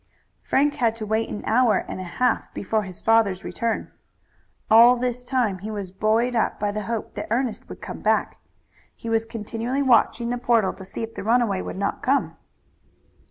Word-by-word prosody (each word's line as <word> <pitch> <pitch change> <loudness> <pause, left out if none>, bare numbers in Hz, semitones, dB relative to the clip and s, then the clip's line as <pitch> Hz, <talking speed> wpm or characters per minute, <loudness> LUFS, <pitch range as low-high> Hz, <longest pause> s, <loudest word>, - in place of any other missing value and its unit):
Frank 290 +2 +2
had 230 -3 +1
to 220 -1 -5
wait 220 +1 0
an 210 - -5
hour 235 0 +3
and - - -6
a - - -4
half 250 -1 +1
before 215 +3 0
his 185 -3 -8
father's 215 -4 +3
return. 230 -1 -3 0.8
All 235 +3 +8
this 250 0 -2
time 245 -7 0
he 210 +4 -6
was 200 -4 -5
buoyed 220 +5 +1
up 225 - 0
by 205 0 0
the 215 +1 -3
hope 230 -2 -4
that - - -5
Ernest 240 0 -2
would - - -10
come - - -6
back. - - 0 0.6
He 230 - -7
was 225 0 +1
continually 230 +4 -3
watching 235 -1 +3
the 245 - -2
portal 230 -5 +2
to 190 - -11
see 195 - -6
if 225 0 -6
the - - -6
runaway 225 -4 +2
would - - -6
not 200 +1 -2
come. 275 +2 +1
225 Hz, 190 wpm, -24 LUFS, 210-245 Hz, 0.8 s, All